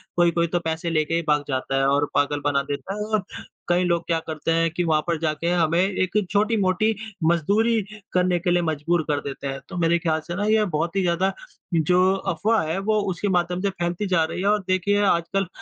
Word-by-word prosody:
कोई-कोई 170 -1 +2
तो 175 +1 0
पैसे 165 +1 -3
लेके 155 0 0
ही 170 - +1
भाग 150 -1 +2
जाता 135 0 -2
है 135 - +2
और 145 +1 +2
पागल 145 0 +1
बना 140 -1 +2
देता 145 +8 -5
है 210 0 -3
और 215 -2 0 0.5
कई 175 +1 +3
लोग 170 -1 +1
क्या 165 -1 +1
करते 160 +1 -2
हैं 165 0 +2
कि 175 +1 -1
वहाँ 155 -2 +2
पर 170 -2 0
जाके 160 +1 -1
हमें 170 -1 +2
एक 190 +1 0
छोटी 215 +2 +2
मोटी 195 +4 +1 0.3
मजदूरी 210 +7 +2 0.3
करने 180 -1 +2
के 175 +1 0
लिए 175 - +3
मजबूर 160 +2 0
कर 145 -1 0
देते 140 0 -6
हैं। 135 0 -4
तो 185 - -6
मेरे 170 0 +3
ख़्याल 160 -1 0
से 170 - -4
ना 205 - -2
ये 215 0 +3
बहुत 170 +5 -1
ही 195 - +2
ज़्यादा 185 +2 +1 0.4
जो 180 +3 +3
अफ़वाह 200 +5 0
है 160 - -1
वो 215 +2 +1
उसके 180 +3 -3
माध्यम 180 -1 0
से 200 - +1
फैलती 175 +2 -3
जा 175 -3 +2
रही 180 - -5
है, 200 - 0
और 210 0 +3
देखिए 200 +2 +1
आजकल 190 +1 +1
175 Hz, 225 wpm, -23 LUFS, 160-195 Hz, 0.5 s, कई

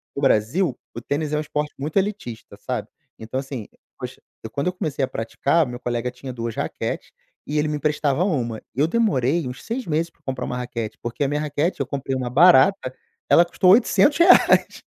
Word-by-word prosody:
no 140 - -3
Brasil 135 - +2 0.2
o - - -5
tênis 150 +1 -2
é 150 - +2
um - - 0
esporte 150 0 -3
muito 150 +6 -3
elitista, 195 - -3
sabe, - - -4 0.3
então, 115 +4 -4
assim, 135 -5 -6 0.3
poxa, - - -7 0.2
eu 110 - -6
quando 140 +9 -2
eu 180 - 0
comecei 150 -6 -3
a - - -11
praticar, 140 +6 0
o - - -7
meu 120 0 -7
colega 120 0 -2
tinha 125 +1 -8
2 115 -2 -4
raquetes - - -4 0.4
e 150 - -2
ele 150 - +1
me 150 - -1
emprestava 150 +1 0
uma. 120 - -2
Eu 145 +5 +2
demorei 165 - +1
uns 125 +1 -8
6 240 +2 -4
meses 165 +2 0
pra - - -37
comprar 130 -2 -3
uma 125 - -4
raquete, 120 -3 -5
porque 120 +4 -3
a - - +2
minha 145 +1 -1
raquete 150 +3 -1
eu - - 0
comprei 135 -1 -3
uma 125 -1 -2
barata. 150 0 +5 0.4
Ela 170 - +6
custou 180 +1 +3
R$800. 290 - +5
145 Hz, 200 wpm, -22 LUFS, 125-165 Hz, 0.4 s, Ela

